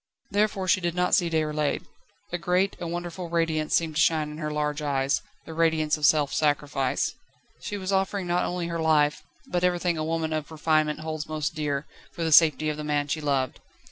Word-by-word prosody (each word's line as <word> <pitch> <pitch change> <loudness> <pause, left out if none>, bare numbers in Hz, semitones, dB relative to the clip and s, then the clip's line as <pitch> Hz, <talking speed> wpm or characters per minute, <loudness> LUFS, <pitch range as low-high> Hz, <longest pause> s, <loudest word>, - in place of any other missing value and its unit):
Therefore 205 -2 +1
she 185 - +3
did 175 -1 -1
not 180 0 +1
see 175 -2 +4
Déroulède. 150 -2 0 0.5
A 175 - -1
great, 180 +3 +1
a 170 - -4
wonderful 175 +1 -5
radiance 165 -2 +1
seemed 165 -2 +1
to - - +4
shine 155 -2 +2
in 150 - -8
her 155 -2 -2
large 150 0 -1
eyes 140 -1 0 0.2
the 160 - -8
radiance 160 -2 +2
of 150 -1 +3
self 150 -3 +3
sacrifice. 145 -3 0 0.5
She 205 - -5
was 190 0 -3
offering 195 0 0
not 175 0 +1
only 180 -1 -2
her 170 -1 -3
life, 150 -2 +3 0.2
but 175 0 -2
everything 175 -2 +1
a - - -1
woman 160 0 -1
of 155 -1 -3
refinement 155 -1 +1
holds 155 -1 -4
most 155 -1 -2
dear, 145 -2 -2 0.3
for 170 - -4
the 160 - 0
safety 155 -1 +6
of 150 -1 -1
the 150 - -5
man 145 -1 -1
she 155 - -1
loved. 135 -3 0
155 Hz, 205 wpm, -26 LUFS, 150-175 Hz, 0.5 s, safety